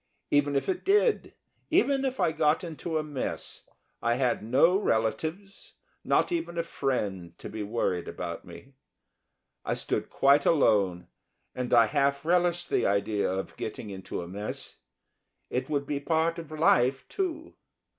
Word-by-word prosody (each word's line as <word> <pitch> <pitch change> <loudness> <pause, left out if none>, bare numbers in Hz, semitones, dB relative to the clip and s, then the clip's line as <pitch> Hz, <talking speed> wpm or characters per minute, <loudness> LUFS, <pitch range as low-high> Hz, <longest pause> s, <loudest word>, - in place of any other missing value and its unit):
Even 145 0 +3
if 140 - 0
it 360 - -1
did, 415 +3 +2 0.3
even 285 -6 +3
if 265 -1 -2
I - - +3
got 155 +1 +2
into 165 -1 -4
a 155 - 0
mess, 145 -4 -4 0.3
I 120 0 +2
had 125 -2 +1
no 135 - +4
relatives, 165 - -1 0.3
not - - +2
even 330 - -2
a 170 - +1
friend, 105 - -3
to - - -8
be 110 - -5
worried 100 -4 -1
about - - -5
me. 135 - -13 0.9
I - - -1
stood - - -2
quite 140 +1 +4
alone, 100 - +3 0.5
and 125 -1 -4
I 115 -2 +7
half 140 +6 +1
relished 175 0 +1
the - - +2
idea 100 0 +1
of 95 +1 -4
getting 105 - -5
into 95 -2 -5
a - - -8
mess 100 +4 -5 0.7
it 125 +5 -2
would 140 -2 0
be 145 0 -2
part 165 +3 0
of 165 -2 -9
life, 135 -4 +2
too. 335 -4 -3
140 Hz, 155 wpm, -28 LUFS, 115-170 Hz, 0.9 s, I